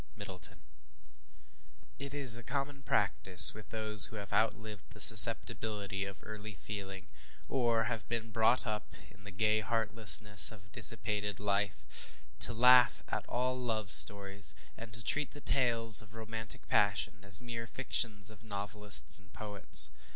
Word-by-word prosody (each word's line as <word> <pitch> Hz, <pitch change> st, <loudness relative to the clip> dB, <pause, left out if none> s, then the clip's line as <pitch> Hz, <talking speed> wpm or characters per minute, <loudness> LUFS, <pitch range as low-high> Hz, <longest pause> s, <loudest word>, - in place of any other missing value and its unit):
MIDDLETON. 95 Hz, -3 st, -8 dB, 1.4 s
IT 140 Hz, 0 st, -9 dB
is 135 Hz, -5 st, +6 dB
a 120 Hz, -, -4 dB
common 140 Hz, +1 st, -7 dB
practice 90 Hz, -8 st, +4 dB
with 110 Hz, 0 st, -15 dB
those 110 Hz, -2 st, -2 dB
who -, -, -14 dB
have 100 Hz, -3 st, -10 dB
outlived 110 Hz, -2 st, -4 dB
the 110 Hz, -, -16 dB
susceptibility 105 Hz, -3 st, +6 dB
of 95 Hz, -2 st, -12 dB
early 110 Hz, -1 st, -11 dB
feeling, 95 Hz, -2 st, -9 dB, 0.4 s
or 120 Hz, -4 st, -2 dB
have 110 Hz, 0 st, -7 dB
been 115 Hz, -1 st, -5 dB
brought 115 Hz, +4 st, 0 dB
up 105 Hz, -2 st, -8 dB, 0.2 s
in 105 Hz, -, -22 dB
the 105 Hz, -, -10 dB
gay 110 Hz, +3 st, -1 dB
heartlessness 110 Hz, -2 st, 0 dB
of 100 Hz, -3 st, -17 dB
dissipated 105 Hz, -2 st, 0 dB
life, 100 Hz, -1 st, -4 dB, 0.5 s
to -, -, +1 dB
laugh 125 Hz, +1 st, +3 dB
at -, -, -6 dB
all 125 Hz, +1 st, -3 dB
love 110 Hz, -6 st, -4 dB
stories, 100 Hz, -4 st, -1 dB, 0.2 s
and 115 Hz, 0 st, -13 dB
to 115 Hz, +1 st, -1 dB
treat 150 Hz, +3 st, -4 dB
the 145 Hz, -, -12 dB
tales 115 Hz, -6 st, +2 dB
of 110 Hz, 0 st, -18 dB
romantic 110 Hz, 0 st, -9 dB
passion 100 Hz, -1 st, -2 dB
as 100 Hz, 0 st, +4 dB
mere 115 Hz, -2 st, -9 dB
fictions 110 Hz, -4 st, -3 dB
of 110 Hz, -1 st, -19 dB
novelists 105 Hz, -1 st, -4 dB
and 95 Hz, -3 st, -25 dB
poets. 105 Hz, -2 st, +4 dB
110 Hz, 145 wpm, -30 LUFS, 100-115 Hz, 1.4 s, is